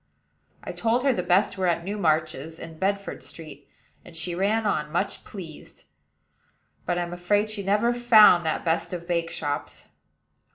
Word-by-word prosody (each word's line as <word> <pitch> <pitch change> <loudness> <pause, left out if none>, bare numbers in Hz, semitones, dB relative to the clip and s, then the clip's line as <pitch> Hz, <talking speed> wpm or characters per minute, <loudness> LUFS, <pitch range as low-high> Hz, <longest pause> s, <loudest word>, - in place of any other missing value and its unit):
I - - -5
told 235 +2 0
her 275 -2 +3
the 185 - -1
best 185 +3 +2
were 185 - +1
at 170 -1 0
Newmarch's, 160 -5 -1
in 165 -1 -10
Bedford 200 +1 -2
Street, 160 -2 -11 0.3
and 170 - -14
she 170 +2 -3
ran 205 +5 0
on, 150 -7 -1
much 170 - -2
pleased; 170 -7 -11 1.0
but 175 0 0
I'm 175 0 -3
afraid 205 +4 +1
she 210 -2 -3
never 210 +5 +2
found 220 -7 +6
that 160 +2 -2
best 170 +1 0
of 170 -1 -6
bake 170 -1 -1
shops. 145 -3 -5
175 Hz, 160 wpm, -25 LUFS, 165-205 Hz, 1.0 s, found